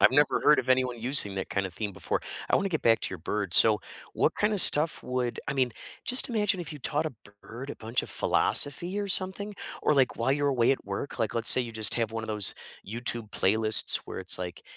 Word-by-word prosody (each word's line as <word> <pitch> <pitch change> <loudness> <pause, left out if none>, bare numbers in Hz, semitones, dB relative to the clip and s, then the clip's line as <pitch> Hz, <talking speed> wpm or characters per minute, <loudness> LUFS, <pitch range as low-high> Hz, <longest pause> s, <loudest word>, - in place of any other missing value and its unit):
I've - - +3
never 145 -2 0
heard 150 -1 +2
of 130 - -15
anyone 130 -2 -2
using 120 -5 +2
that 95 - -7
kind 95 0 -4
of 95 - -13
theme 100 +2 -7
before. - - -5 0.3
I - - -1
wanna 195 - -2
get 160 -5 -5
back 115 -1 0
to - - -6
your 95 - -9
bird, 100 +2 -6
so 110 -2 +7 0.3
what - - -2
kind 210 +1 -3
of 205 - +4
stuff 155 0 +6
would 125 -1 -6
I - - -4
mean, 130 -2 -2 0.3
just 250 +3 +4
imagine 210 -5 -2
if 175 - -8
you 150 - -11
taught 150 +3 -4
a - - -6
b 125 - -25 0.3
bird 125 +5 -11
a - - -8
bunch 115 +2 -4
of - - -9
philosophy 175 +7 0
or 200 - -7
something 190 +2 +1 0.3
or, 150 - 0
like, 135 -2 -1
while 115 +3 -3
you're 145 0 -3
away 125 -4 -1
at - - -8
work, 100 +9 -8
like, 115 -3 -4
let's 115 0 -1
say - - +8
you 115 -2 -10
just 110 -1 +3
have 115 -2 -4
one 115 0 -7
of 110 - -11
those 105 -2 +5 0.3
YouTube 115 0 -4
playlists 110 +2 +3
where - - -10
it's, 95 -1 +4
like, 90 -1 -9
125 Hz, 250 wpm, -24 LUFS, 110-150 Hz, 0.3 s, say